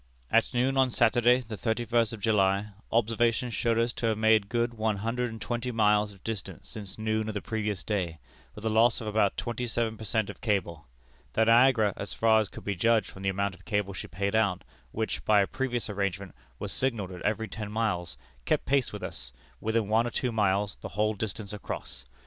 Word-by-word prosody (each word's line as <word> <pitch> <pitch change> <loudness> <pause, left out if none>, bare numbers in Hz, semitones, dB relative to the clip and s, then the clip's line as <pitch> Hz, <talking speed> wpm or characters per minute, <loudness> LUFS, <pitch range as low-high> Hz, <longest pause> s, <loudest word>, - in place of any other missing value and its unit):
"At 115 +1 +3
noon 130 +2 +1
on 130 -1 +4
Saturday, 120 +1 +4
the 110 -3 -7
thirty 110 +4 -1
first 115 -1 +2
of 115 - -6
July, 100 -1 +2 0.2
observations 115 +1 +1
showed 115 0 +1
us 115 +1 +1
to 115 - -2
have 110 -1 +1
made 110 -2 +4
good 120 0 0
one 110 -2 0
hundred 120 +4 -1
and 110 0 -8
twenty 120 +2 -3
miles 105 -2 +3
of 95 -2 -18
distance 110 -4 -5
since 100 -3 -7
noon 110 0 -1
of 110 - -4
the - - 0
previous 105 0 -2
day, 90 -6 -2 0.4
with 105 - -9
a - - +2
loss 115 +1 +4
of 115 - -6
about 105 -2 +1
twenty 120 +1 -3
seven 115 -1 -1
per 110 - -8
cent 110 0 0
of - - -17
cable. 85 - -1 0.5
The 110 - +3
Niagara, 115 -3 +5
as 100 - -4
far 110 -1 +4
as 105 -3 -1
could - - -10
be 100 - -1
judged 115 +4 +2
from 95 - -11
the 95 - 0
amount 100 +1 -1
of 95 - -16
cable 105 -1 -1
she 95 - -6
paid 100 +4 -2
out, 100 -5 +2 0.3
which, 110 0 -2
by 105 -1 +5
a - - +3
previous 125 +1 -2
arrangement, 100 -2 -3 0.2
was - - -4
signalled 115 -8 -1
at 90 -1 -8
every 110 +2 0
ten 105 -2 -6
miles, 90 - -1 0.3
kept - - 0
pace 135 -2 +2
with - - -7
us, 60 - -4 0.3
within 110 -1 0
one 110 +3 +3
or - - -1
two 125 +1 -1
miles, 100 -2 +1
the - - -7
whole 110 +1 +2
distance 105 0 -5
across. 100 -10 -7
110 Hz, 215 wpm, -28 LUFS, 100-115 Hz, 0.5 s, Niagara